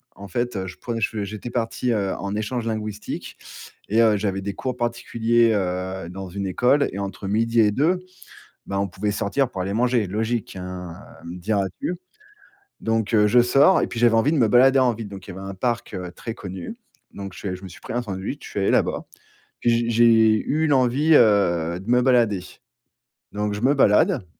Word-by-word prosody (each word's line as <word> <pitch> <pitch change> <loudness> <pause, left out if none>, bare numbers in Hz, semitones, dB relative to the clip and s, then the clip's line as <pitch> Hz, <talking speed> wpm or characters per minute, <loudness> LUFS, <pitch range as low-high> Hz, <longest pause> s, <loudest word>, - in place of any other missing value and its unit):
En 100 - -10
fait, 120 0 -2
heu, 95 - -3
je 90 - -8
prenais, 115 -2 -4
je 105 -1 -1
j'étais 110 +4 -6
parti, 120 +1 -1
heu, 100 -3 -1
en 100 +1 -4
échange 115 +2 -3
linguistique 110 -2 -5 0.5
et 110 +3 +3
heu, 110 -2 +4
j'avais 100 -1 -2
des 100 +1 -4
cours 130 +5 -4
particuliers, 120 -1 +1
heu, 95 -2 -3
dans 95 +1 -7
une 100 +2 -5
école 125 +9 +2
et 100 - -6
entre 100 0 -5
12:00 115 +2 +2
et 105 -1 +4
2, 160 - +1 0.7
bah 100 0 -2
on 100 - 0
pouvait 105 +4 -2
sortir 115 +7 0
pour 95 - -4
aller 95 +2 -3
manger. 120 0 +1
Logique, 110 +2 -2
hein, 90 -2 -7 0.3
heu, 85 +1 -7
diras-tu 100 - -2 0.9
donc 115 0 -1
heu, 105 -2 +5
je 120 +4 +5
sors 140 +9 +5
et - - 0
puis 120 - -6
j'avais 120 -1 +5
envie 115 +6 +3
de 160 - +1
me 120 - +4
balader 130 +4 +5
en 125 -3 +3
ville. 110 -1 -7
Donc, 95 -2 -10
il - - -9
y - - -9
avait 95 - -7
un 95 - -6
parc, 120 +4 -2
heu, 90 -1 -5
très 115 +2 -6
connu. 95 -5 -7 0.4
Donc, 100 -2 -8
je 95 -3 -4
je 90 - -10
me - - -7
suis 90 - -13
pris - - -7
un 120 - 0
sandwich, 100 +5 -5
je - - -8
suis 100 - -3
allé 95 - +2
là-bas. - - +1 0.6
Puis, 120 - +3
j 115 0 +1
j'ai 115 -2 +5
eu 160 +2 +1
l'envie, 140 +3 +3
heu, 85 - +3
de 95 +5 -9
me 125 +1 +4
balader. 115 -7 +3 0.9
Donc, 105 0 -2
je 105 - -5
me 130 +4 +4
balade 105 -6 +3
110 Hz, 210 wpm, -23 LUFS, 95-120 Hz, 0.9 s, heu